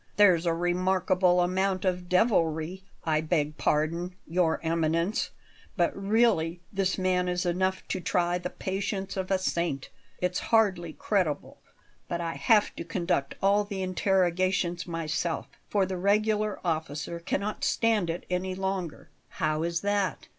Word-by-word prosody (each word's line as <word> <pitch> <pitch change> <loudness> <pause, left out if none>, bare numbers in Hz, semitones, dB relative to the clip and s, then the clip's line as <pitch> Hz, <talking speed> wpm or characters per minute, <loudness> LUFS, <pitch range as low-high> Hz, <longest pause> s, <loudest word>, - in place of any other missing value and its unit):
"There's 180 -5 +5
a 165 - +3
remarkable 180 +1 +2
amount 185 +1 0
of 180 -1 -1
devilry 180 -3 +2 0.2
I 155 -1 +1
beg 155 -2 0
pardon, 170 +4 0
Your 170 -1 +1
Eminence, 165 +4 +1 0.5
but 175 -2 +2
really 195 -5 +2
this 195 -1 0
man 185 -1 +1
is 180 +1 -1
enough 185 +2 0
to 185 - -1
try 175 0 +1
the 180 - -4
patience 195 +1 -3
of 190 -1 -3
a 190 - +3
saint. 170 -6 -2 0.3
It's 180 0 0
hardly 190 -7 +3
credible, 185 -7 -1 0.5
but 170 - -2
I 165 -1 -2
have 215 -4 +3
to - - -4
conduct 170 -4 -1
all 200 +1 +4
the 200 -2 -4
interrogations 185 -1 +1
myself, 165 0 -2 0.2
for 200 -2 +2
the 185 0 -4
regular 210 +2 +1
officer 160 0 -2
cannot 200 +5 -3
stand 220 -6 +2
it 165 +1 -4
any 185 +1 -2
longer." 190 -3 -4 0.2
"How 155 0 -1
is 170 0 -1
that?" 205 -1 -1
180 Hz, 140 wpm, -28 LUFS, 170-195 Hz, 0.5 s, There's